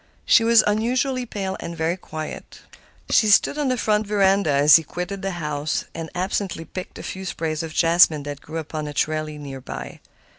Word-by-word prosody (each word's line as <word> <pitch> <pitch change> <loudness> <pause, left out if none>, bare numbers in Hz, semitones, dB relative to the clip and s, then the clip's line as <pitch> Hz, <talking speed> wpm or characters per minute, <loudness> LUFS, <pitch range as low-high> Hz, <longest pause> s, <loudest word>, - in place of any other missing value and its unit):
She 230 - +5
was 230 -1 +6
unusually 245 +4 0
pale 195 -3 -4
and 170 0 -6
very 165 +2 0
quiet. 155 -4 -8 0.5
She 215 - +4
stood 210 +8 +4
on 290 - 0
the 255 -1 0
front 210 -1 +1
veranda 195 -3 +2
as 145 +2 +7
he - - -2
quitted 180 +5 -5
the 195 -1 -3
house, 150 -2 -2
and 165 -1 -6
absently 185 -2 -2
picked 185 +2 -8
a - - -8
few 190 - -6
sprays 160 -4 -3
of 165 -1 -6
jessamine 165 -3 +4
that 145 0 -7
grew 160 +2 -7
upon 155 -1 -5
a 145 - -7
trellis 155 0 -1
near 135 -2 -8
by. 65 - -8
170 Hz, 190 wpm, -22 LUFS, 155-205 Hz, 0.5 s, as